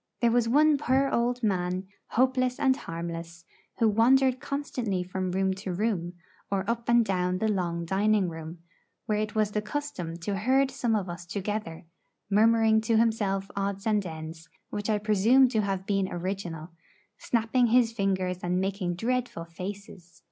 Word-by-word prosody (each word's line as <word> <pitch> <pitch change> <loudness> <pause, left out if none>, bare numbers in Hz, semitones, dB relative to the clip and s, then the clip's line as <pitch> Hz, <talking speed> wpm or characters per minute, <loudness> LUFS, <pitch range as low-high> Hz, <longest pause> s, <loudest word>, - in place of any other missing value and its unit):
There 235 -1 +3
was 235 -1 +2
one 295 +3 +4
poor 270 -1 +2
old 245 +1 0
man, 185 -2 0 0.2
hopeless 255 0 +1
and 265 -1 +3
harmless, 170 -3 -7 0.3
who 230 - +3
wandered 255 +4 +4
constantly 245 -10 -3
from 185 +1 -3
room 190 +1 +1
to 190 - -4
room, 180 -3 -1 0.4
or 195 -1 -1
up 235 0 -2
and 235 -1 +5
down 180 -2 0
the 220 - 0
long 175 -5 -1
dining 200 +2 +2
room, 165 0 -7 0.5
where 210 -1 0
it 215 0 -3
was 215 -1 +1
the 210 - -1
custom 210 - -4
to 195 +3 -2
herd 265 +6 +2
some 245 -4 0
of 200 -3 -1
us 175 0 -7
together, 200 -3 -4 0.5
murmuring 220 +1 +4
to 225 0 +1
himself 205 -4 +1
odds 200 +1 -2
and 210 -2 +2
ends 160 -1 -8 0.2
which 205 +1 -3
I 215 - +3
presume 215 +5 +4
to 220 -3 +1
have 195 -2 -2
been 195 -2 0
original, 175 -2 -4 0.5
snapping 235 +1 +1
his 235 0 +4
fingers 190 -4 -1
and 180 +1 0
making 190 -2 -2
dreadful 240 -3 -2
faces. 180 0 -9
205 Hz, 160 wpm, -27 LUFS, 180-230 Hz, 0.5 s, and